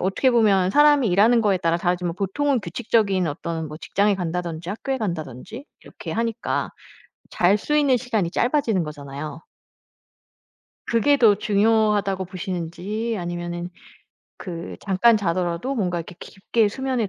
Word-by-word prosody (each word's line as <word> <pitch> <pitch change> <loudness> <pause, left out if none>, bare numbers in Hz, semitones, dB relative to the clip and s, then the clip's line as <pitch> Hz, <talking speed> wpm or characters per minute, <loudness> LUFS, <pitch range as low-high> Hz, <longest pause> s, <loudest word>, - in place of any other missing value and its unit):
어떻게 195 +8 +2
보면 200 -6 +3
사람이 290 -3 +5
일하는 220 +6 +4
거에 205 -3 +2
따라 165 0 +1
다르지만 175 -1 -1
보통은 250 +7 0
규칙적인 195 -1 0
어떤 160 +2 -4
뭐 150 - -8
직장에 200 +4 +1
간다든지 170 -2 -4
학교에 265 +5 -3
간다든지 175 - -5 0.2
이렇게 - - -8
하니까 230 -1 -2 0.6
잘 190 +4 +3
수 300 +8 -1
있는 280 -4 +4
시간이 220 -8 -1
짧아지는 235 - +1
거잖아요. 150 +1 -7 1.5
그게 280 +5 +3
더 220 -6 +5
중요하다고 205 -2 +1
보시는지 185 +5 -4
아니면은 175 0 -5 0.7
그 170 -3 -7
잠깐 205 +4 +3
자더라도 180 +5 -1
뭔가 180 -7 -1
이렇게 170 +2 -8
깊게 210 +3 0
수면에 255 -2 -2
195 Hz, 340 characters per minute, -23 LUFS, 175-230 Hz, 1.5 s, 사람이